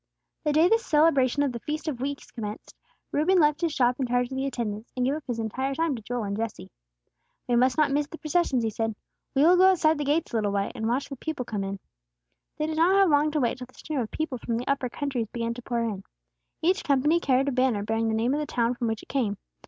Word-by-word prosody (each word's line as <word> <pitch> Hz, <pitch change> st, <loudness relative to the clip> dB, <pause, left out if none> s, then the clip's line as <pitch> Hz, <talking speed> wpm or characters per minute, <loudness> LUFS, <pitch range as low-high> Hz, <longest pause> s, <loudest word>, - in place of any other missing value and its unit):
The 300 Hz, -, +3 dB
day 315 Hz, +4 st, +5 dB
the 450 Hz, +4 st, +4 dB
celebration 295 Hz, -, +3 dB
of 280 Hz, -, 0 dB
the 235 Hz, -, -5 dB
Feast 305 Hz, +7 st, -4 dB
of 260 Hz, -6 st, -3 dB
Weeks 280 Hz, +1 st, -4 dB
commenced, 210 Hz, -2 st, -7 dB, 0.4 s
Reuben 350 Hz, +6 st, +3 dB
left 300 Hz, 0 st, +3 dB
his 335 Hz, -2 st, +1 dB
shop 250 Hz, -2 st, +1 dB
in 260 Hz, -, 0 dB
charge 245 Hz, +1 st, 0 dB
of -, -, -4 dB
the 265 Hz, +1 st, -1 dB
attendants, 220 Hz, -4 st, -4 dB
and 250 Hz, -, +1 dB
gave 270 Hz, -, +1 dB
up 310 Hz, 0 st, -4 dB
his 245 Hz, -2 st, -2 dB
entire 260 Hz, +5 st, -2 dB
time 325 Hz, -2 st, 0 dB
to 230 Hz, -, -7 dB
Joel 240 Hz, +2 st, -3 dB
and 200 Hz, -1 st, -3 dB
Jesse. 220 Hz, -, -5 dB, 0.8 s
"We 245 Hz, -, +2 dB
must 250 Hz, +3 st, +3 dB
not 300 Hz, -2 st, +3 dB
miss 290 Hz, +1 st, +1 dB
the 325 Hz, -, -9 dB
processions," 305 Hz, -6 st, +1 dB
he 220 Hz, -, 0 dB
said. 225 Hz, 0 st, -2 dB, 0.4 s
"We 275 Hz, -, +4 dB
will 350 Hz, +3 st, +6 dB
go 375 Hz, +1 st, +7 dB
outside 320 Hz, -5 st, +3 dB
the -, -, 0 dB
gates 290 Hz, 0 st, 0 dB
a -, -, +2 dB
little 205 Hz, -2 st, 0 dB
way, 200 Hz, 0 st, -1 dB
and 225 Hz, -3 st, -3 dB
watch 250 Hz, +4 st, -1 dB
the 275 Hz, -, -6 dB
people 300 Hz, -3 st, -4 dB
come 210 Hz, -3 st, -3 dB
in." 195 Hz, 0 st, -4 dB, 0.8 s
They 305 Hz, -, 0 dB
did 315 Hz, 0 st, -3 dB
not 345 Hz, +4 st, +4 dB
have 390 Hz, -4 st, +5 dB
long 295 Hz, +1 st, +4 dB
to 305 Hz, 0 st, -1 dB
wait 245 Hz, -1 st, 0 dB
till 250 Hz, -, -7 dB
the 255 Hz, -, -22 dB
stream 305 Hz, -3 st, -4 dB
of 225 Hz, -4 st, -2 dB
people 305 Hz, -6 st, -3 dB
from 230 Hz, -1 st, -2 dB
the 245 Hz, -, -5 dB
upper 275 Hz, -3 st, 0 dB
countries 255 Hz, -3 st, -3 dB
began 230 Hz, -1 st, -2 dB
to 245 Hz, -, -9 dB
pour 235 Hz, -1 st, -2 dB
in; 205 Hz, -4 st, -3 dB, 0.6 s
each 370 Hz, +4 st, +2 dB
company 295 Hz, +4 st, +3 dB
carried 270 Hz, -3 st, +2 dB
a -, -, -2 dB
banner 255 Hz, -5 st, +1 dB
bearing 225 Hz, +1 st, 0 dB
the 220 Hz, -, 0 dB
name 235 Hz, +4 st, +1 dB
of 295 Hz, -, 0 dB
the 300 Hz, -, -3 dB
town 235 Hz, 0 st, +1 dB
from 240 Hz, -1 st, -2 dB
which 225 Hz, -1 st, -3 dB
it -, -, -17 dB
came. 225 Hz, -7 st, 0 dB
260 Hz, 265 wpm, -26 LUFS, 230-300 Hz, 0.8 s, go